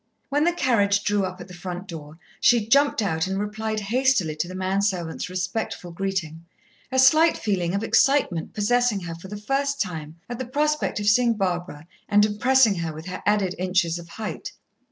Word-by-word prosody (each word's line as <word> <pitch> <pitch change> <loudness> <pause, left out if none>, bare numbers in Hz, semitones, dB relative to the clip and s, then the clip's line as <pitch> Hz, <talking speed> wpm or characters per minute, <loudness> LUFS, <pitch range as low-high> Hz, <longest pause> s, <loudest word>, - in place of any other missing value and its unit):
When 290 +2 +2
the 345 - +4
carriage 205 -10 +2
drew 205 -1 +1
up 185 0 -6
at - - -9
the 180 - -12
front 180 +1 -7
door, 155 -3 -9 0.2
she 235 -3 +4
jumped 280 -1 +3
out 160 -3 0
and 190 0 -2
replied 215 +1 -3
hastily 220 - +1
to 175 - -1
the 185 - -8
man 190 +1 0
servant's 180 -4 -2
respectful 180 0 -3
greeting, 170 -3 -3 0.5
a 260 - -1
slight 310 +6 +5
feeling 185 -4 -1
of 200 - -1
excitement 270 - +2
possessing 220 0 +1
her 170 -1 -6
for 170 +3 -10
the 205 +2 -7
first 275 +6 -1
time 160 - -4
at 240 0 -6
the 260 - -4
prospect 300 -1 0
of 205 - -3
seeing 235 +2 +4
Barbara, 175 -6 -3 0.2
and 205 0 +5
impressing 230 +2 +3
her 165 -1 -2
with 155 +1 -9
her 185 0 -6
added 205 -3 +2
inches 180 -2 +1
of 170 0 -12
height. 220 +3 -6
200 Hz, 190 wpm, -24 LUFS, 175-240 Hz, 0.5 s, slight